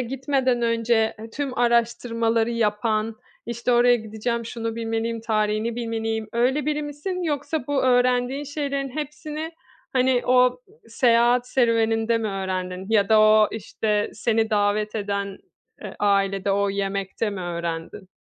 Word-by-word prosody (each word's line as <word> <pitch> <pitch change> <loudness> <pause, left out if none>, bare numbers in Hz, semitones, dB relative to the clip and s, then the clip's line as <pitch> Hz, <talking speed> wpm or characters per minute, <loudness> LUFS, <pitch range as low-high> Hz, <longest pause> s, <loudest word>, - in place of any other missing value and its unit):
gitmeden 260 0 0
önce, 230 -1 +1
eee, 225 +1 -9
tüm 275 -2 -4
araştırmaları 235 -1 +1
yapan, 220 -1 0 0.3
işte, 235 +1 -1
"Oraya 245 0 +5
gideceğim, 220 +1 -3
şunu 230 0 -4
bilmeliyim, 225 0 -2
tarihini 215 +1 0
bilmeliyim." 225 -2 -3
öyle 255 +5 +1
biri 300 0 0
misin 295 +6 -4
yoksa 295 -2 -2
bu 285 -1 0
öğrendiğin 250 +2 +2
şeylerin 280 -1 -3
hepsini, 305 +2 -5 0.4
hani, 255 -1 +2
o, 250 0 +6 0.2
ııı, 440 +3 -24
seyahat 240 +1 +3
serüveninde 230 -2 +2
mi 220 - -2
öğrendin? 185 -1 -4
Ya 205 -3 +3
da 220 -1 +6
o, 215 0 +6
işte, 210 -1 -2
seni 220 +1 0
davet 210 0 +1
eden, 200 -2 -3 0.4
eee, - - -8
ailede 195 -1 +1
o 200 0 +1
yemekte 195 +2 -2
mi 200 - -5
öğrendin? 170 +1 -5
230 Hz, 135 wpm, -24 LUFS, 215-250 Hz, 0.4 s, o